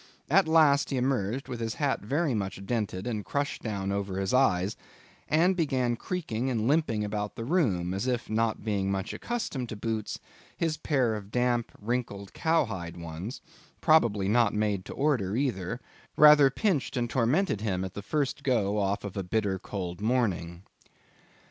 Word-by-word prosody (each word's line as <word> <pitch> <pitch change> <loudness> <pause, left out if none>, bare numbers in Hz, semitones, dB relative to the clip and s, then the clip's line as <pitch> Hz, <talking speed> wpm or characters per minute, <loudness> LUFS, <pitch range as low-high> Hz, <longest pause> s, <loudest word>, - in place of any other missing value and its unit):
At 190 +1 +5
last, 155 -3 +4
he 135 - -1
emerged 125 -1 -1
with 120 - -5
his 115 0 -3
hat 145 -2 0
very 145 +7 0
much 100 -2 -3
dented 100 -4 -2
and 110 -4 -2
crushed 145 +5 -2
down 100 -3 -3
over 100 -1 -2
his 95 +2 -1
eyes, 100 -6 +3 0.5
and 170 +5 +4
began 130 -8 +1
creaking 130 -6 -3
and 115 -3 0
limping 140 -8 +2
about 105 0 -3
the 115 - -5
room, 105 - +1
as 100 +6 -2
if, 125 -2 -1
not 110 0 0
being 100 -3 0
much 95 -1 -2
accustomed 145 - -3
to - - -5
boots, 110 0 -3 0.4
his 160 -2 0
pair 130 -7 +1
of 105 -2 -6
damp, 120 0 0
wrinkled 105 -3 -3
cowhide 95 - 0
ones—probably 105 - 0
not 115 +1 +3
made 105 -3 0
to - - -7
order 125 -10 +1
either—rather 135 +5 +3
pinched 160 - 0
and 120 -1 0
tormented 130 - +1
him 95 -4 -1
at 95 - -7
the 100 - -6
first 145 +4 -1
go 105 -7 +1
off 100 0 0
of 100 -2 -6
a 100 - -1
bitter 95 0 -1
cold 90 -2 -5
morning. 95 -7 0
115 Hz, 160 wpm, -28 LUFS, 100-135 Hz, 0.5 s, At